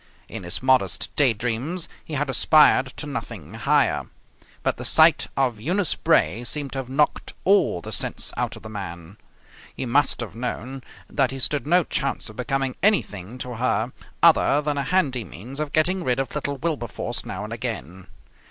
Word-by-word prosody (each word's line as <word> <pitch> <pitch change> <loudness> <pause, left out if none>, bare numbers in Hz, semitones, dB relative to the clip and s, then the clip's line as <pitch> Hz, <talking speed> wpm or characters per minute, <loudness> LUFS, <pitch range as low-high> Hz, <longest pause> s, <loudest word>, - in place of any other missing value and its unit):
In - - -7
his 90 +6 -3
modest 130 -8 +1
day 140 -4 +5
dreams 125 - -2 0.2
he 155 - -6
had 145 +1 0
aspired 135 +1 +5
to - - -5
nothing 110 - -6
higher. 140 +5 +1 0.6
But - - 0
the - - -6
sight - - +5
of 125 -5 +1
Eunice 180 - +1
Bray 115 +6 +2
seemed 140 +2 -1
to 135 - -3
have 130 -2 -6
knocked 145 +3 0
all 195 - +3
the - - -8
sense - - 0
out - - -2
of - - -13
the - - -7
man. 95 -2 -8 0.6
He - - -4
must 135 +4 +2
have 115 - -6
known 125 +2 -5 0.3
that 135 -3 +1
he 135 - -6
stood 140 +2 +1
no 175 +2 +4
chance 140 -6 -2
of - - -16
becoming 135 +1 -2
anything 115 - +1
to 125 -2 -6
her 115 0 0 0.3
other 160 -3 +5
than 145 -1 -1
a - - 0
handy 140 -10 +1
means 110 - -9
of 155 -2 -3
getting 175 +4 +1
rid 125 -2 0
of 135 -2 -3
little 145 -1 -3
Wilberforce 140 -7 -3
now 95 +2 -6
and 110 +2 -6
again. 105 -6 -5
130 Hz, 180 wpm, -24 LUFS, 115-145 Hz, 0.6 s, day